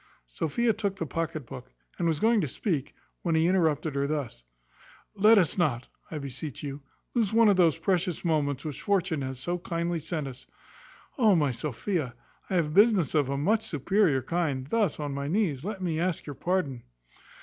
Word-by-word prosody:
Sophia 160 - 0
took 200 -2 -2
the 170 - -3
pocket 155 -1 -3
book, - - -10 0.3
and 170 - +1
was 160 -3 +1
going 225 +1 +3
to 155 - -1
speak, 150 - -2 0.3
when 170 -2 0
he 160 0 +3
interrupted 160 -4 +2
her 140 0 0
thus: 140 - -4 0.7
"Let 215 +2 +6
us 185 -1 +2
not, 130 -8 +1 0.2
I 160 - -5
beseech 140 0 -6
you, 140 0 -5 0.3
lose 225 -5 +1
one 225 -1 +6
of 200 - +5
these 170 -4 +4
precious 180 -3 0
moments 145 -3 0
which 150 -4 -5
fortune 185 -6 0
hath 130 -1 -4
so 175 +7 -3
kindly 170 -1 -2
sent 155 -2 -3
us. 130 -1 -10 0.7
O, 215 -5 +5
my 145 -5 +2
Sophia! 135 - -3 0.3
I 190 - -1
have 155 -4 +1
business 200 - +4
of 145 -4 +2
a 140 - -1
much 205 +10 +2
superior 155 -2 +1
kind. 150 -6 -1
Thus, 200 +1 0
on 145 -2 -3
my 140 0 -3
knees, 160 -6 0
let 195 -1 -4
me 165 -3 -1
ask 175 -1 -1
your 145 - -6
pardon." 150 -6 -1
160 Hz, 185 wpm, -28 LUFS, 140-190 Hz, 0.7 s, Let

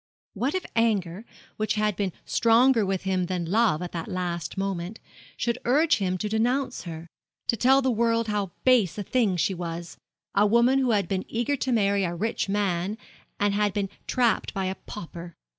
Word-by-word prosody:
What 250 - -1
if 370 - -2
anger, 210 -4 0 0.3
which 215 0 0
had 210 -1 +1
been 195 -1 -1
stronger 235 +1 +4
with 190 -1 -1
him 185 -2 0
than 180 -2 -2
love 195 -2 +2
at 175 - -5
that 165 -2 -5
last 175 -2 -3
moment, 195 +1 -3 0.4
should 235 +1 -1
urge 300 +6 +3
him 185 -3 -1
to 210 - -3
denounce 245 +4 0
her 165 -1 -7 0.4
to - - +1
tell 265 +4 +4
the 260 - +2
world 230 0 +1
how 205 -3 -1
base 240 -9 +4
a 205 - -2
thing 210 -4 +1
she 190 - +1
was 170 -1 -6 0.4
a 205 +1 +4
woman 235 +5 +4
who 260 -2 +1
had 205 -5 +2
been 190 0 -2
eager 240 +5 -1
to 260 - -2
marry 200 -3 +2
a 175 -1 -2
rich 210 +2 -2
man 195 0 0 0.4
and 205 0 +2
had 205 -1 +1
been 200 -1 -1 0.2
trapped 240 -3 +1
by 195 -1 -1
a 185 - -1
pauper! 170 -3 -8
205 Hz, 190 wpm, -26 LUFS, 185-230 Hz, 0.4 s, stronger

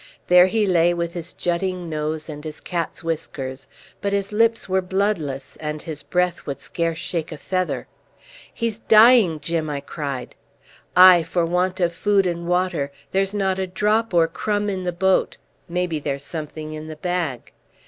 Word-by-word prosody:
There 180 0 +7
he 215 +2 +1
lay 175 -2 +3
with 170 0 -2
his 170 -1 -5
jutting 180 0 -2
nose 155 0 -3
and 150 -2 -8
his 155 -1 -7
cat's 170 -1 -4
whiskers, 135 -5 -4 0.3
but 200 0 -1
his 200 0 -1
lips 230 +2 +2
were 190 0 +1
bloodless, 180 -8 -2
and 150 0 -4
his 150 -2 -7
breath 180 +2 -1
would 140 -1 -4
scarce 165 +1 -2
shake 170 -2 -3
a 155 - -6
feather. 185 +3 -2 0.7
"He's 230 -2 -2
dying, 220 -7 +6
Jim!" 165 -1 -2
I 145 -1 -2
cried. 140 -3 -5 0.6
"Aye, 180 -1 +9
for 165 +1 0
want 180 +2 0
of 175 -2 +1
food 200 +2 +2
and 170 -1 -2
water. 180 -5 0 0.2
There's 195 +1 0
not 190 -2 0
a 190 - -1
drop 215 +4 +1
or 170 -2 +4
crumb 205 +4 -1
in 185 -1 -4
the 180 - 0
boat. 190 +2 +1 0.3
Maybe 175 -2 -1
there's 140 -1 -3
something 155 0 -6
in 155 0 -7
the 155 - -7
bag." 170 -6 -3
175 Hz, 170 wpm, -22 LUFS, 155-190 Hz, 0.7 s, Aye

